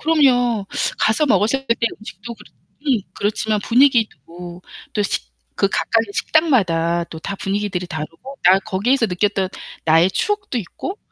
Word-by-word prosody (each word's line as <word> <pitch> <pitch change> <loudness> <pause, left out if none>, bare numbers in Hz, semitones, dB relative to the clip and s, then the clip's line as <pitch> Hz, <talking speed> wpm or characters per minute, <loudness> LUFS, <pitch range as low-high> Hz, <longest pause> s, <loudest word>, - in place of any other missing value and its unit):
그럼요. 245 -9 +3 0.3
가서 220 +8 +2
먹었었을 230 +5 +2
때 230 - +3
그때 230 - 0
음식도 215 +2 -9
그렇고 - - -18 0.3
음, 260 -6 +3 0.2
그렇지만 210 +1 -1
분위기도 180 - +1 0.3
또 210 - 0
식 - - -3 0.2
그 195 - +2
각각의 225 +1 0
식당마다 175 - +2
또 160 -1 -10
다 200 +3 -5
분위기들이 195 -2 -2
다르고, 165 - -7
아이 185 +2 +6
거기에서 230 +6 +1
느꼈던 190 0 0 0.4
나의 165 +3 +5
추억도 405 - -1
있고 370 - -6
210 Hz, 340 characters per minute, -20 LUFS, 180-245 Hz, 0.4 s, 아이